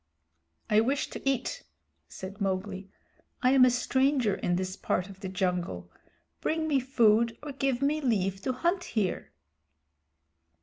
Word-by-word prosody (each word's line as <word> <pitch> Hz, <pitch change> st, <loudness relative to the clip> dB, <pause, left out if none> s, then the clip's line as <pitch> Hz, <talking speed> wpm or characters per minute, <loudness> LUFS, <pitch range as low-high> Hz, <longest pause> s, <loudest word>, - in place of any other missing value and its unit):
"I 210 Hz, -1 st, +4 dB
wish 270 Hz, +5 st, -1 dB
to -, -, -6 dB
eat," 260 Hz, -2 st, -2 dB, 0.5 s
said 195 Hz, +3 st, -9 dB
Mowgli. 190 Hz, 0 st, -2 dB, 0.5 s
"I 250 Hz, -, +5 dB
am 265 Hz, -1 st, +6 dB
a -, -, +5 dB
stranger 255 Hz, -1 st, +2 dB
in 175 Hz, -, -1 dB
this 185 Hz, +1 st, -2 dB
part 185 Hz, -1 st, -1 dB
of 190 Hz, -1 st, -12 dB
the 190 Hz, -2 st, -5 dB
jungle. 180 Hz, -, -2 dB, 0.5 s
Bring 315 Hz, 0 st, -1 dB
me 285 Hz, -3 st, +3 dB
food, 230 Hz, -3 st, +3 dB
or 295 Hz, -, -5 dB
give 270 Hz, -1 st, -1 dB
me 300 Hz, +2 st, +1 dB
leave 195 Hz, -7 st, 0 dB
to 260 Hz, -, -1 dB
hunt 345 Hz, +8 st, 0 dB
here." 195 Hz, -, -2 dB
225 Hz, 145 wpm, -29 LUFS, 190-270 Hz, 0.5 s, am